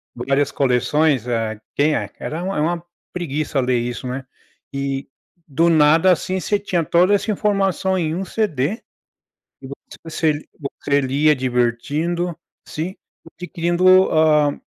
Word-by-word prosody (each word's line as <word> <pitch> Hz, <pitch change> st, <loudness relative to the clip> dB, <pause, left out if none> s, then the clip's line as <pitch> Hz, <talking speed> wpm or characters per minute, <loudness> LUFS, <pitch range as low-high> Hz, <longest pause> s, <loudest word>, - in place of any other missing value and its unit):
várias 135 Hz, +3 st, 0 dB
coleções, 135 Hz, 0 st, +1 dB
eh, 115 Hz, -3 st, -2 dB, 0.2 s
quem 150 Hz, +1 st, +2 dB
é -, -, -3 dB
era 160 Hz, +3 st, -5 dB
uma 195 Hz, +1 st, -2 dB
era 150 Hz, -, +1 dB
uma 170 Hz, +1 st, -1 dB, 0.3 s
preguiça 155 Hz, -4 st, -2 dB
ler 125 Hz, -1 st, +1 dB
isso, 120 Hz, +1 st, -4 dB
né. 130 Hz, +1 st, -5 dB, 0.5 s
E, 140 Hz, 0 st, -3 dB, 0.4 s
do 165 Hz, +3 st, +2 dB
nada, 160 Hz, +3 st, +5 dB
assim 185 Hz, +2 st, 0 dB
,você 205 Hz, +3 st, 0 dB
tinha 180 Hz, -4 st, -1 dB
toda 175 Hz, +5 st, +3 dB
essa 205 Hz, +2 st, +1 dB
informação 195 Hz, -2 st, 0 dB
em 160 Hz, -2 st, -1 dB
um 190 Hz, -, -2 dB
CD, 185 Hz, -, -1 dB, 0.8 s
tipo 135 Hz, 0 st, -8 dB, 0.3 s
você 160 Hz, -1 st, 0 dB, 0.5 s
você 140 Hz, 0 st, +2 dB
lia 140 Hz, +3 st, +2 dB
divertindo, 140 Hz, +8 st, -1 dB, 0.3 s
sim 170 Hz, +5 st, -5 dB, 0.4 s
adquirindo 180 Hz, +1 st, +3 dB
a 150 Hz, -2 st, +3 dB
155 Hz, 135 wpm, -20 LUFS, 135-175 Hz, 0.8 s, nada